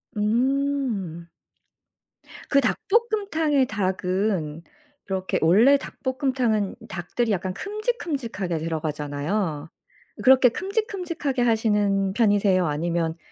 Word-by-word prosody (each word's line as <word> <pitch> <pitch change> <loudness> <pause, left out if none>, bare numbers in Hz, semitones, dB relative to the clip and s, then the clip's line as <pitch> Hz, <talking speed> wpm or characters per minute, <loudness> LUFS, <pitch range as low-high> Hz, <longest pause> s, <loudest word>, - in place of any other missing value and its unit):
음. 230 - 0 1.2
그 275 - +4
닭볶음탕의 355 - +1
닭은 185 -5 -1 0.4
이렇게 190 -1 -2
원래 220 - +6
닭볶음탕은 255 -7 -1
닭들이 215 +6 -2
약간 185 -1 -1
큼직큼직하게 290 - -3
들어가잖아요. 155 +1 -3 0.5
그렇게 260 -1 +7
큼직큼직하게 360 - -2
하시는 210 -4 +2
편이세요 205 -4 +3
아니면 165 +2 -1
215 Hz, 250 characters per minute, -24 LUFS, 180-275 Hz, 1.2 s, 그렇게